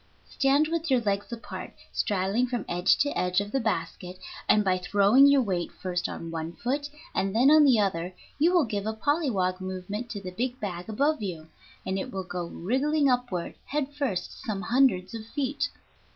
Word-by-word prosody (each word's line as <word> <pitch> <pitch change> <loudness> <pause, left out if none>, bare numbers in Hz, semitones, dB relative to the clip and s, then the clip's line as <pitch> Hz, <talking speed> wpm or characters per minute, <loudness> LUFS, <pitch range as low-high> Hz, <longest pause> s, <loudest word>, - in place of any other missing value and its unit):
Stand 280 +3 +2
with 330 -1 -2
your 260 -2 +4
legs 205 -2 -1
apart, 235 -1 -7 0.2
straddling 205 +4 +1
from 240 -4 -3
edge 175 +1 +3
to 285 - 0
edge 180 +1 +1
of 205 0 -4
the 270 - +1
basket, 180 -4 -3 0.3
and 210 - +5
by 185 -1 +2
throwing 205 +9 +5
your 280 -2 +5
weight 180 -5 -2
first 180 -1 -3
on 165 0 -6
one 165 0 -4
foot 285 +7 -2 0.2
and 195 +1 -1
then 255 +5 +6
on 310 0 +8
the 255 -5 +5
other 180 -3 -1 0.2
you 330 +4 +4
will 350 -4 +4
give 205 -2 -3
a 220 - -1
polliwog 220 - 0
movement 190 +5 -5
to 210 - -5
the 185 -2 -7
big 245 +6 -3
bag 180 -2 -5
above 280 +5 +1
you, 165 -6 -5 0.4
and 190 +1 -1
it - - -5
will 190 -1 -3
go 175 -1 -4
wriggling 275 - +1
upward 245 -9 -1
head 290 -1 -2
first 270 -11 -3
some 205 -3 -3
hundreds 230 -8 +2
of 225 -1 -5
feet. 270 +5 -2
210 Hz, 190 wpm, -27 LUFS, 185-270 Hz, 0.4 s, on